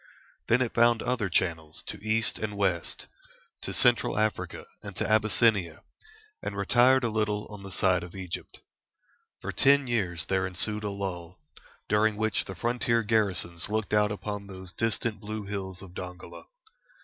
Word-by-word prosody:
Then 125 +3 +4
it 120 - -4
found 120 -1 +4
other 120 -5 0
channels 80 -3 -1
to - - -7
east 110 +1 +1
and 105 -2 -4
west, 95 -4 -1 0.6
to - - -5
Central 120 -3 +3
Africa 110 0 -1 0.2
and - - -8
to - - -1
Abyssinia, 110 -5 +2 0.6
and 100 - -4
retired 125 +6 +4
a 120 - +1
little 105 -1 -1
on 105 -1 -9
the 95 0 -9
side 90 -1 +2
of 90 +2 -9
Egypt. 95 -3 -7 0.8
For - - -3
ten 140 0 +4
years 90 -10 -1
there 95 +1 0
ensued 105 +3 -1
a 105 - -1
lull, 95 -3 -5 0.5
during 105 0 +2
which 110 0 0
the 95 - -7
frontier 115 +3 +1
garrisons 95 -5 0
looked 110 0 -1
out 105 0 +4
upon 105 -1 -5
those 95 -1 -9
distant 115 -1 0
blue 110 0 -5
hills 95 -2 -5
of 90 -2 -12
Dongola. 90 0 -8
105 Hz, 160 wpm, -28 LUFS, 95-110 Hz, 0.8 s, Then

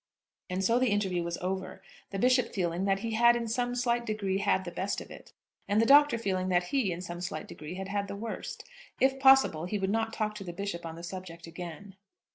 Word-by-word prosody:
And 185 +1 -1
so 230 +5 +3
the 255 -1 +2
interview 195 -4 0
was 170 0 -3
over, 190 0 -4 0.3
the 195 - -4
Bishop 250 +4 +2
feeling 175 -1 0
that 195 0 +1
he 230 0 -3
had 235 +2 +5
in 235 -1 -2
some 245 +2 -1
slight 240 -1 +1
degree 200 -4 -1
had 190 -1 +1
the 175 - -5
best 195 +3 -2
of - - -11
it, - - -12 0.4
and 205 +1 +2
the 225 - +4
Doctor 285 0 +6
feeling 185 -4 -1
that 175 -1 +3
he, 255 -9 +2
in 170 +1 -4
some 175 -1 -6
slight 180 +2 -4
degree, 155 +3 -8
had 190 +1 -5
had 200 0 -1
the 200 - -5
worst. 225 +3 -6 0.4
If 270 0 +3
possible, 265 - +5
he 205 +4 -2
would 195 0 -1
not 225 +1 0
talk 215 -1 -2
to 200 - -7
the 175 -2 -6
Bishop 175 -2 -4
on 165 - -7
the 170 - -10
subject 175 -2 -7
again. 175 +3 -9
195 Hz, 235 wpm, -30 LUFS, 180-230 Hz, 0.4 s, Doctor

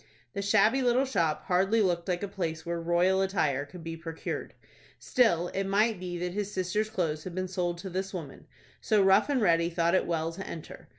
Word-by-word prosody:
The 200 - -3
shabby 215 +6 +3
little 250 +1 +3
shop 170 - 0
hardly 190 +5 +2
looked 175 -4 +1
like 180 +1 -1
a - - -1
place 165 -5 -4
where 170 0 -2
royal 175 +3 +2
attire 155 -8 0
could 165 +4 -11
be 165 0 -5
procured. 165 0 -6 0.4
Still 175 -9 +2
it 195 0 -2
might 210 +1 +2
be 180 -1 -5
that 180 0 -3
his 205 0 -3
sister's 200 +4 -1
clothes 165 -7 -2
had 180 -2 -7
been 185 0 -2
sold 175 -2 -2
to 190 +3 -7
this 190 +2 -3
woman; 160 -8 -8 0.3
so 215 -3 +3
Rough 195 +7 +4
and 280 -3 +2
Ready 170 -2 +3
thought 170 0 +1
it 185 - +2
well 165 -1 -1
to 190 +3 -7
enter. 160 - -9
185 Hz, 210 wpm, -29 LUFS, 170-200 Hz, 0.4 s, Rough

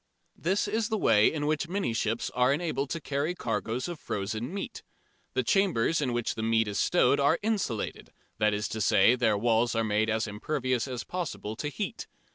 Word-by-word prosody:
This 190 +5 0
is 220 +1 -1
the 220 - 0
way 105 - +4
in 150 -2 -2
which 155 +2 0
many 185 - -1
ships 115 0 -1
are 125 +1 +3
enabled 140 -3 -1
to 165 - -3
carry 145 +3 -2
cargoes 120 -1 -2
of 175 -3 -6
frozen 110 +6 -3
meat. 195 +1 -5 0.5
The - - +2
chambers 170 - +2
in 130 -4 0
which 120 -1 -1
the 110 - -5
meat 115 0 +2
is 100 -1 -2
stowed 160 -5 +3
are 145 +4 +4
insulated 200 - -2 0.3
that 105 0 +3
is 105 +1 -1
to 110 - -4
say, 115 - +5
their 110 -4 +2
walls 115 +1 +2
are 115 - +2
made 110 0 +1
as 110 0 +1
impervious 130 +4 -2
as 125 -2 -4
possible 110 - -4
to 150 - -3
heat. 205 +8 -5
125 Hz, 195 wpm, -28 LUFS, 110-165 Hz, 0.5 s, say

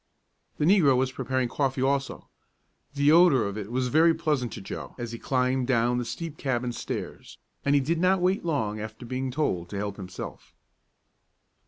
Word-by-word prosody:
The 150 - +1
negro 160 -8 +5
was 130 0 +1
preparing 130 -1 -1
coffee 135 0 -1
also. 135 0 -1 0.7
The 145 +1 +4
odor 160 -8 +6
of 100 0 -4
it 105 -2 -5
all 115 - -9
was 130 0 0
very 160 +4 +5
pleasant 150 -7 -1
to - - -6
Joe - - -7
as 120 -2 -5
he 115 - -7
climbed 130 -1 0
down 120 -1 +2
the 120 - -3
steep 155 +6 -6
cabin 125 -3 -1
stairs, 120 - -6 0.3
and 140 0 +3
he 140 - +4
did 165 +5 0
not 185 +2 +3
wait 185 +3 +1
long 110 -11 -1
after 110 +3 -7
being 130 +2 -3
told 125 - -1
to 100 - -5
help 100 0 -3
himself. 95 -2 -8
130 Hz, 185 wpm, -27 LUFS, 120-150 Hz, 0.7 s, odor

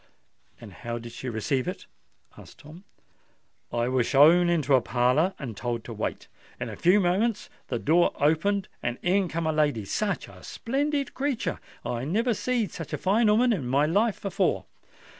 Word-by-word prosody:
"And 105 -4 -11
how 120 +4 -5
did 120 0 -8
she 125 +2 -6
receive 125 +3 -1
it?" - - -5 0.5
asked - - -14
Tom. 160 +6 -13 0.9
"I 120 0 0
was 125 -2 +1
showed 165 +6 +6
into 155 -5 +1
a 130 - +6
parlour 125 +11 +1
and 125 -7 -6
told 115 +3 -3
to 115 - -8
wait. 110 - -4 0.3
In - - -4
a - - -7
few 185 +4 +4
minutes 200 +4 0 0.2
the 120 - -2
door 165 +8 +3
opened 185 +7 +1
and 120 0 -2
in 185 +2 +2
come 170 0 -3
a 160 - +1
lady—such 150 - -1
a - - -14
splendid 280 +3 -2
creatur! 270 -3 -2 0.3
I 120 0 -3
never 225 - +1
seed 230 -4 -1
such 165 - -8
a - - 0
fine 210 +4 +2
'ooman 235 +3 +4
in 145 - -3
my 140 +4 +3
life 205 +7 +1
before. 195 -3 0
160 Hz, 175 wpm, -26 LUFS, 125-205 Hz, 0.9 s, showed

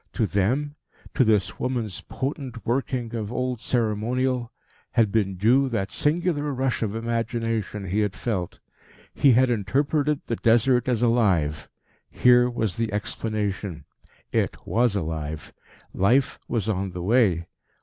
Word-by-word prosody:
To 115 - +1
them 125 +10 0 0.4
to - - +4
this 100 -5 +1
woman's 120 -7 -2
potent 130 0 -5
working 120 -1 -1
of 110 -2 -3
old 125 -1 -2
ceremonial 120 +2 0 0.4
had 115 -4 +3
been 100 -3 +1
due 125 +8 +3
that 100 -5 -2
singular 150 -1 0
rush 130 -1 -1
of 110 -2 -1
imagination 115 -3 -2
he 95 +3 -1
had 105 -2 0
felt. 95 -7 -3 0.5
He 135 -3 +5
had 125 +1 +4
interpreted 140 +6 0
the 115 - -2
Desert 120 +2 +3
as 120 -1 +1
alive. 95 -11 +1 0.4
Here 125 0 +5
was 110 -6 -2
the 115 -2 -1
explanation. 105 -3 -3 0.5
It - - 0
was 120 -2 +2
alive. 80 -4 -4 0.4
Life 125 +8 +2
was 115 -4 -1
on 95 -3 -1
the 90 -1 -5
way. 95 -6 +3
115 Hz, 135 wpm, -25 LUFS, 100-125 Hz, 0.5 s, He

